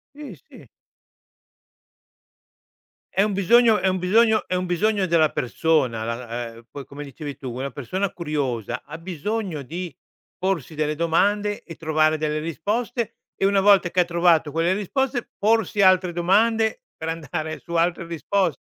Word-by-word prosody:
Sì, 290 -8 -9
sì. - - -15 2.5
È 195 - +4
un 205 -1 0
bisogno 220 +3 +5
è 190 - +1
un 185 0 0
bisogno 215 +4 +3
è - - -1
un 180 0 0
bisogno 195 +3 +1
della 165 -4 +3
persona 130 -4 0
la 115 0 -4
uhm, 115 - -14
poi 140 -3 -8
come 145 +2 -8
dicevi 145 +1 -8
tu 130 -3 -6
una 130 +3 -4
persona 185 - -3
curiosa 135 - -3
ha 150 - -7
bisogno 180 +1 -4
di 170 +6 -6 0.4
porsi 180 -6 -2
delle 150 0 -1
domande 205 +6 +1
e 165 - -10
trovare 155 -1 +2
delle 155 0 -1
risposte 215 +9 -3 0.2
e - - -1
una 195 0 +4
volta 195 -3 +5
che 180 - +2
ha - - +4
trovato 170 -3 +3
quelle 165 +4 +1
risposte, 240 +6 -1
porsi 210 -1 +2
altre 185 -2 +4
domande 220 - +2
per 160 - -5
andare 155 0 -4
su 170 - -9
altre 170 0 +1
risposte. 170 - -1
170 Hz, 155 wpm, -23 LUFS, 155-200 Hz, 2.5 s, bisogno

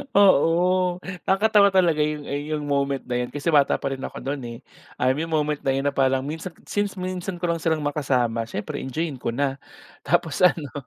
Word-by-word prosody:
Oo, 180 -1 +4 0.3
nakatawa 205 +1 +5
talaga 180 -5 +3
'yung, 150 0 0
ah, - - -8
'yung 150 0 -3
moment 140 -1 -1
na 125 0 -2
'yun 125 - -2
kasi 145 +6 -2
bata 145 -2 +4
pa 135 - -3
rin 135 - -4
ako - - -7
no'n, 140 +1 -3
eh, 115 0 -7 0.4
um, 130 +1 +2
'yung 155 +5 -2
moment 150 -2 0
na 135 - 0
'yun 135 - -1
na 145 - +1
parang 130 -1 +1
minsan 160 +4 -6
since 205 -1 -2
minsan 185 0 -4
ko 175 0 -1
lang 165 - -2
silang 160 -2 0
makasama 125 -6 0
siyempre 145 +7 -5
enjoyin 140 +1 -4
ko 120 -1 -3
na. 135 0 -1 0.4
Tapos 160 0 0
ano, 170 -6 +3
150 Hz, 200 wpm, -24 LUFS, 135-175 Hz, 0.4 s, nakatawa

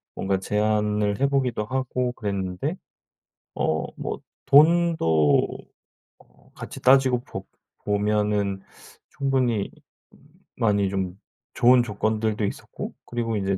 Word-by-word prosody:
뭔가 95 0 -1
제안을 105 0 0
해 140 - +4
보기도 125 -6 0
하고 125 +1 -1
그랬는데 100 - -3 0.8
어 80 0 0
뭐 - - -4 0.3
돈도 145 - +4 0.7
어 - - -25
같이 - - -8
따지고 130 -1 +4
보 - - -7 0.4
보면은 105 -1 0 0.5
충분히 130 -6 0 0.9
많이 100 -3 +2
좀 95 -1 -3 0.4
좋은 125 0 +5
조건들도 110 -1 -1
있었고 100 - -6
그리고 115 -2 -2
이제 95 -1 -1
105 Hz, 215 characters per minute, -24 LUFS, 100-125 Hz, 0.9 s, 좋은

